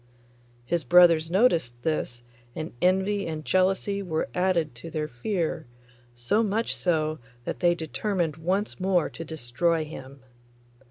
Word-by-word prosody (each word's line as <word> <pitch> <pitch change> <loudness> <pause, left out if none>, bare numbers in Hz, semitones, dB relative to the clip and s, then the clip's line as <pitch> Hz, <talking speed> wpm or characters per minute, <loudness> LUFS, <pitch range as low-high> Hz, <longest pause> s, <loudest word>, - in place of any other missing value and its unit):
His 170 +5 -1
brothers 165 +1 +6
noticed 170 - +2
this, 120 -6 -2 0.3
and 155 0 -5
envy 190 +2 +2
and 155 -2 -5
jealousy 190 +5 +1
were 160 -5 -2
added 180 -5 +1
to 125 +8 -9
their 155 -1 -3
fear, 160 - -3 0.5
so 120 - +1
much 225 +1 0
so 155 -3 0 0.3
that - - -4
they 175 -1 +3
determined 170 -1 -2
once 190 +7 -1
more 185 -3 +1
to 165 - -7
destroy 160 +2 -1
him. 140 -3 -10
165 Hz, 130 wpm, -26 LUFS, 155-185 Hz, 0.5 s, brothers